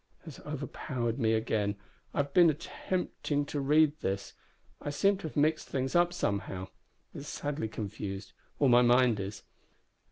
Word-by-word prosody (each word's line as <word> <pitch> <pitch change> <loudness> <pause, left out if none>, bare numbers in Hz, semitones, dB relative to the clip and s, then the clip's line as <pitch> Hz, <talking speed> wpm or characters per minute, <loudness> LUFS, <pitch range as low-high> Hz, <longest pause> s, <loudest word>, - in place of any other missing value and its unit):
has 160 -5 -9
overpowered 130 -4 -3
me 110 -2 +3
again. 110 -2 0 0.4
I - - +1
have 140 0 -12
been 175 -2 +7
attempting 155 -2 -2
to 145 - -3
read 150 +2 +4
this. 100 +1 -3 0.5
I - - -3
seem 195 +7 +2
to 185 - -5
have 155 - -8
mixed 155 +2 +2
things 130 +2 -2
somehow. 100 - -2 0.4
It - - -7
is 145 - -8
sadly 145 -4 -3
confused 100 -2 -6 0.2
or 140 - +3
my 120 -1 +7
mind 120 -2 +4
is. 100 0 -5
135 Hz, 155 wpm, -31 LUFS, 110-150 Hz, 0.5 s, been